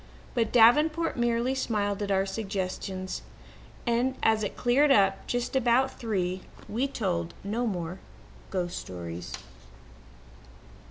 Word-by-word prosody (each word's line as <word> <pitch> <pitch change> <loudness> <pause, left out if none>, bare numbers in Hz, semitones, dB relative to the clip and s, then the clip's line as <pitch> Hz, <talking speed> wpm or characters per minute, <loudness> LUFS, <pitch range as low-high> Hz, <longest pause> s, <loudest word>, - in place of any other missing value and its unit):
But 230 -3 +1
Davenport 305 +8 +5
merely 240 +1 +1
smiled 210 -5 -1
at 205 - -2
all 195 - +3
our 195 - +2
suggestions 190 -2 -3 0.6
and, 245 +2 +1
as 220 -1 +3
it 205 - -3
cleared 265 +5 +4
up 195 -6 +3
just 245 +2 -2
about 255 +1 +2
three, 185 -5 -1 0.3
we 245 +6 0
told 175 -10 -2
no 225 +5 -1
more 180 -2 -3 0.5
ghost 180 -2 -2
stories. 85 -1 -7
215 Hz, 120 wpm, -28 LUFS, 190-245 Hz, 0.6 s, Davenport